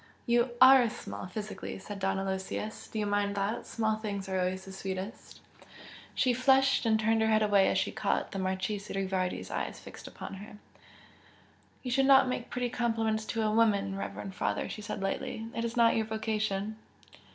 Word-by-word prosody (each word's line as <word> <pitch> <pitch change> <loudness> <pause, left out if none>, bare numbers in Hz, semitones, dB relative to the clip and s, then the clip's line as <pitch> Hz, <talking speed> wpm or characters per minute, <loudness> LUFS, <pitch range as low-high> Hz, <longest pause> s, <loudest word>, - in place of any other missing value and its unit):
You 240 +1 +3
ARE 255 -2 +8
small, 215 - -7
physically" 210 +3 -6
said 200 +1 -8
Don 195 0 0
Aloysius 195 +2 -4
Do - - -7
you 210 - 0
mind 205 0 0
that? 200 +3 -2
Small 220 -1 0
things 205 -3 -4
are 190 -1 -1
always 185 +1 -1
sweetest!" 195 +4 -6 0.7
She 255 -2 +3
flushed, 265 0 +3
and 220 -1 +3
turned 225 +1 +2
her 220 - +3
head 215 0 +3
away 200 -2 +4
as - - +1
she - - 0
caught - - -1
the 195 - -4
Marchese 190 +2 -2
Rivardi's 190 -1 -2
eyes - - -3
fixed - - -11
upon - - -8
her. 210 0 -11 1.3
"You 250 - -3
should 270 +1 +3
not 270 -1 +7
make 250 -1 -3
pretty 250 -1 -2
compliments 225 -2 0
to 225 0 -2
a 215 - +1
woman, 205 -3 +2
reverend 195 0 -5
father!" - - -1
she 215 - -6
said, 205 -1 -5
lightly 215 +3 -3
"It 230 - -2
is 235 +1 -3
not 230 -1 +5
your 220 -1 0
vocation!" 215 -1 -2
215 Hz, 180 wpm, -30 LUFS, 195-230 Hz, 1.3 s, ARE